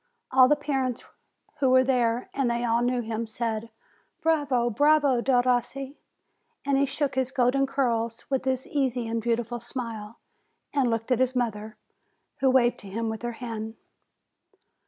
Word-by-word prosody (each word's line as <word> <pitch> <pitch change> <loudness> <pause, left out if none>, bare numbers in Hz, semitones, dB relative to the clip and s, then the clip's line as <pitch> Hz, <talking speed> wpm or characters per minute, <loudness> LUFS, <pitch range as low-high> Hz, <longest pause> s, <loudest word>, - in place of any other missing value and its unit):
All 255 -1 +7
the 295 - +4
parents 270 -4 -2 0.6
who 270 - +3
were 255 0 +6
there 245 -2 0
and 270 -3 0
they 235 0 -1
all 235 0 +2
knew 245 0 +1
him 225 0 -3
said: 225 0 -3 0.5
"Bravo, 280 -7 +2
bravo, 290 0 +3
Derossi!" 255 +2 0 0.7
And 275 -1 +2
he 280 - +2
shook 280 0 -1
his 260 -1 0
golden 270 +1 +2
curls, 235 -4 -1
with 270 -1 -1
his 260 -1 -1
easy 260 -5 -1
and 230 0 -2
beautiful 235 +1 -1
smile, 230 -3 -6 0.6
and 275 -4 +2
looked 225 +2 -2
at 250 - +3
his 260 0 +1
mother, 220 -3 -2 0.6
who 270 -1 +3
waved 245 -2 +3
to 200 - -11
him 225 +3 -2
with 220 0 -5
her 240 0 -3
hand. 225 -2 -6
245 Hz, 155 wpm, -26 LUFS, 230-265 Hz, 0.7 s, All